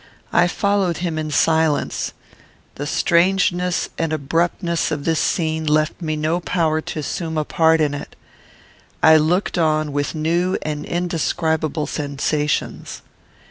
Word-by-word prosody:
I 175 - +5
followed 195 -2 0
him 160 -2 -2
in 155 0 -3
silence. 160 0 +1 0.6
The 145 - -5
strangeness 180 +1 +2
and 165 -1 0
abruptness 165 +3 0
of 150 -3 -3
this 165 -1 +1
scene 160 -2 0
left 155 +3 +1
me 155 -2 -2
no 155 +3 0
power 160 -3 0
to - - -7
assume 160 +2 -3
a 155 - 0
part 160 +1 +3
in 150 -2 +1
it. 145 - -7 0.9
I 160 0 +8
looked 175 +4 +1
on 155 -2 +1
with 145 +2 -2
new 170 +4 0
and 150 -1 -4
indescribable 160 -3 -1
sensations. 145 0 -2
160 Hz, 135 wpm, -20 LUFS, 155-170 Hz, 0.9 s, I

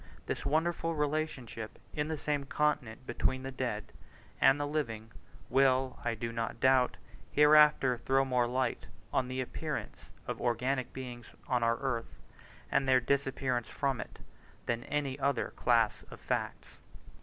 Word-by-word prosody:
This - - -3
wonderful 165 +2 +1
relationship 145 -7 -2 0.2
in 150 0 -1
the 160 -1 -2
same 145 -1 -1
continent 135 -5 -1
between 130 0 -1
the 135 - -4
dead 120 -5 -3 0.5
and 135 +2 +6
the 145 - 0
living, 115 -7 -3 0.4
will, 130 0 +3
I 120 -1 0
do 115 +1 -4
not 115 -1 -3
doubt, 130 -1 +4 0.3
hereafter 150 -4 +6
throw 135 +3 +2
more 125 -2 +2
light 125 0 -1 0.3
on 130 - +2
the 130 0 -2
appearance 125 - -5 0.2
of - - -4
organic 125 +2 0
beings 125 -2 -7 0.2
on 125 -1 +1
our 115 0 +2
earth, 125 -3 -3 0.6
and 135 - +2
their 130 -1 +6
disappearance 130 -2 0
from 135 -3 -1
it, - - -10 0.5
than 120 0 -2
any 145 -2 -2
other 140 -3 +1
class 115 -3 +2
of - - -11
facts. - - -3
130 Hz, 145 wpm, -32 LUFS, 120-140 Hz, 0.6 s, and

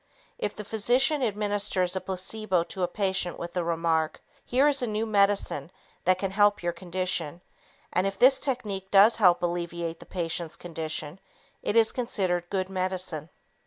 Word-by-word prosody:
If 205 - -2
the 210 - -7
physician 250 +8 +2
administers 205 -4 0
a 190 - -1
placebo 190 0 -1
to 185 +2 -7
a 180 - +2
patient 190 -1 -1
with 170 0 -6
the 180 - -1
remark, 165 -1 0 0.2
"Here 265 +4 +3
is 285 -2 +2
a 245 - 0
new 215 +1 -1
medication 200 -8 +1 0.4
that 185 +1 +4
can 195 0 -2
help 205 -1 +3
your 175 0 0
condition" 175 -2 -2 0.5
and 185 +2 +2
if 195 0 -4
this 260 +4 +6
technique 210 -8 -3
does 205 +4 +6
help 180 -5 +4
alleviate 170 -1 -3
the - - -13
patient's 170 -2 -3
condition, 160 -1 -5 0.4
it 205 - -2
is 225 -1 +5
considered 185 -8 -1
good 185 -1 -1
medicine. 185 -4 -3
185 Hz, 165 wpm, -27 LUFS, 175-210 Hz, 0.5 s, this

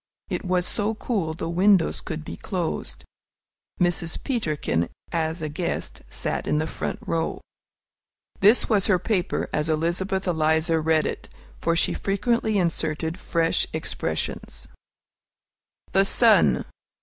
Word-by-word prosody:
It - - -2
was 180 -2 +1
so 210 +3 0
cool 195 -9 -2
the 165 - -4
windows 185 +1 +3
could 155 0 -5
be - - -6
closed. 180 -5 -4 0.7
Mrs. 175 -2 +1
Peterkin, 155 - -1 0.2
as 160 -1 -1
a - - -1
guest, 160 +4 -3
sat - - -2
in - - +2
the 155 - +1
front - - -4
row. 165 -1 -1 1.0
This 210 +5 +5
was 205 -4 +2
her 190 - +4
paper, 185 0 -1
as 150 +1 0
Elizabeth 175 +5 0
Eliza 160 -1 +2
read 160 0 +2
it, - - -4 0.3
for 165 - +1
she 170 - +2
frequently 220 +2 0
inserted 165 -1 0
fresh 165 -1 +1
expressions: - - -3 1.2
THE 195 - +5
SUN. 225 +2 +4
170 Hz, 125 wpm, -25 LUFS, 160-195 Hz, 1.2 s, This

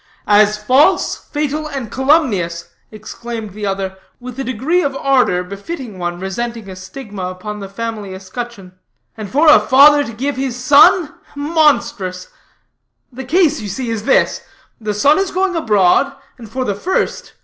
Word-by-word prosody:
"As 210 0 +4
false, 265 - +3
fatal, 300 +1 -2
and 270 -7 -6
calumnious," 255 - 0 0.2
exclaimed 220 0 -8
the 205 +1 -5
other, 195 -1 -3 0.2
with 250 +1 -9
a - - -1
degree 265 +9 0
of 280 -5 -2
ardor 260 -10 +2
befitting 200 - -8
one 175 0 -3
resenting 225 +3 -5
a 190 - -8
stigma 195 0 -8
upon 185 +3 -6
the 195 -1 -8
family 210 -2 -5
escutcheon, 195 0 -8 0.4
"and 215 -3 -7
for 295 +8 +2
a 300 - +8
father 285 +6 +6
to 230 - -7
give 265 +5 -3
his 260 -2 -2
son 295 +5 +5 0.2
monstrous. 285 - 0 0.8
The 265 +2 -7
case 310 0 +2
you 210 - -6
see 230 +4 -4
is 220 -1 -4
this: - - +2 0.4
The 210 -2 -3
son 285 - +4
is 390 -1 0
going 375 0 -1
abroad, 215 - +3 0.3
and 225 -3 -11
for 255 +3 -3
the 205 - -1
first. 345 - -2
235 Hz, 160 wpm, -17 LUFS, 200-280 Hz, 0.8 s, a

